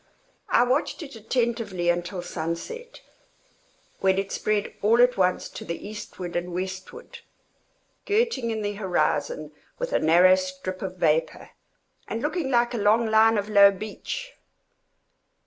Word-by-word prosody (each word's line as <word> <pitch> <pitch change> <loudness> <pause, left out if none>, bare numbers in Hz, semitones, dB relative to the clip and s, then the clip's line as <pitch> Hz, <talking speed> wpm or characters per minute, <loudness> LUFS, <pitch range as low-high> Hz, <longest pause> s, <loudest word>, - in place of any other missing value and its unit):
I 240 - +5
watched 260 +6 0
it 280 -4 -10
attentively 225 -5 -1
until 175 +1 -1
sunset, 175 - -5 1.0
when 190 0 +2
it 195 0 -2
spread 210 -1 -1
all 225 +3 +4
at 245 0 +5
once 185 -1 +1
to - - -8
the 170 +3 -6
eastward 190 -4 -7
and 175 +1 -2
westward, 190 - -6 0.9
girting 415 - +1
in 220 -1 -2
the 205 0 -2
horizon 205 - -1 0.3
with - - -4
a - - +3
narrow 175 +4 +6
strip 185 0 -3
of 185 -1 -5
vapor, 160 -1 0 0.6
and 225 - -3
looking 305 -1 -1
like 240 -1 +2
a - - -2
long 220 +2 +3
line 220 0 +5
of 205 0 -1
low 200 -2 +7
beach. 215 - -6
205 Hz, 140 wpm, -25 LUFS, 185-240 Hz, 1.0 s, low